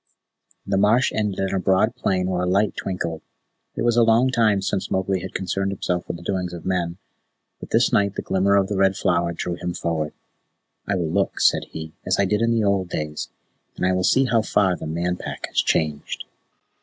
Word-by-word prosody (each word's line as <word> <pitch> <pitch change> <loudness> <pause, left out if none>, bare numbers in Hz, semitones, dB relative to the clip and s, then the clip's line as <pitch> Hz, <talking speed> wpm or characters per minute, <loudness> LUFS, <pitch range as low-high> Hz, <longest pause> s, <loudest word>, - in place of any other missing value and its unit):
The 100 0 +1
marsh 110 +6 +4
ended 105 -3 -1
in 95 0 -1
a 95 - +1
broad 95 +5 +2
plain 90 -1 0
where 90 -1 -1
a 90 - 0
light 100 +4 +2
twinkled. 85 -4 -3 0.5
It - - -2
was 120 0 +2
a - - +6
long 115 +3 +4
time 110 -5 +2
since 95 - -2
Mowgli 95 0 0
had 95 +1 -8
concerned 95 +1 -1
himself 90 -2 -2
with - - -4
the 85 - -12
doings 90 -1 -2
of 85 - -8
men, 90 -2 -1 0.6
but - - -9
this - - +3
night 100 -1 +2
the - - -4
glimmer 95 +1 +2
of 100 -1 +4
the 100 - -2
Red 95 0 +3
Flower 85 -2 +1
drew 85 +1 -3
him 90 0 -4
forward. 80 -3 -2 0.7
"I 100 - +1
will 85 -4 -1
look," - - 0
said - - +3
he, 80 0 -8
"as 95 - 0
I 100 - +4
did 105 +3 0
in 115 - +2
the 115 -1 +2
old 100 -3 +1
days, 75 -2 -4 0.5
and - - 0
I 95 - +3
will 95 0 0
see 135 +7 +4
how 115 -2 +2
far 95 -4 +2
the - - -7
Man 85 +3 -1
Pack - - -5
has - - +1
changed." 75 -2 -1
95 Hz, 220 wpm, -23 LUFS, 90-100 Hz, 0.7 s, a